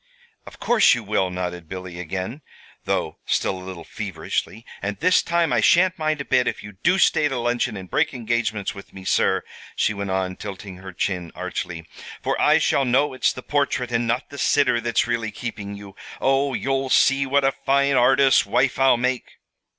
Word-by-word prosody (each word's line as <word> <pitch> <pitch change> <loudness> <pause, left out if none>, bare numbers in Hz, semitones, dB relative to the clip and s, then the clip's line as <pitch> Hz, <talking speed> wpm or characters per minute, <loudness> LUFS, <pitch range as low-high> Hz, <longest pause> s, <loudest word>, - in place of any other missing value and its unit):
"Of - - -12
course 235 - +4
you 120 - -5
will," 100 -3 0
nodded 90 -2 -5
Billy, 90 -2 -7
again, 95 - -5 0.4
though - - -2
still 95 - -1
a - - -10
little 90 -2 -8
feverishly. 105 +2 -4 0.2
"And 100 +1 -3
this 185 +4 +3
time 170 0 +1
I - - +3
sha'n't 185 0 +4
mind 155 -1 0
a - - -6
bit 130 -1 +2
if - - -3
you 105 - -9
do 180 +1 +3
stay 155 -5 +3
to 135 -3 -3
luncheon, 120 -3 -1
and 95 -1 -8
break - - +1
engagements 115 -4 -2
with 100 -1 -12
me, 95 -1 -11
sir," - - +2 0.3
she 105 - +1
went 100 -1 -4
on, 95 -1 -2
tilting 100 -2 -8
her 95 +1 -9
chin 90 -1 -3
archly, 85 -2 -5 0.4
"for - - 0
I - - +5
shall 140 - +2
know 135 +3 +2
it's 130 - +1
the 130 - -9
portrait 140 -4 -1
and 120 0 0
not 120 +4 -2
the 140 - -8
sitter 125 -3 +2
that's 120 0 +1
really 115 -2 -1
keeping 105 -3 -6
you. 100 -1 -11 0.2
Oh, 135 0 +1
you'll 135 +4 -1
see 135 +1 +3
what 140 +1 +2
a 135 - +4
fine 140 +1 +1
artist's 130 +1 +5
wife 125 +6 +1
I'll 135 -2 +5
make!" 125 0 -2
120 Hz, 195 wpm, -23 LUFS, 95-135 Hz, 0.4 s, I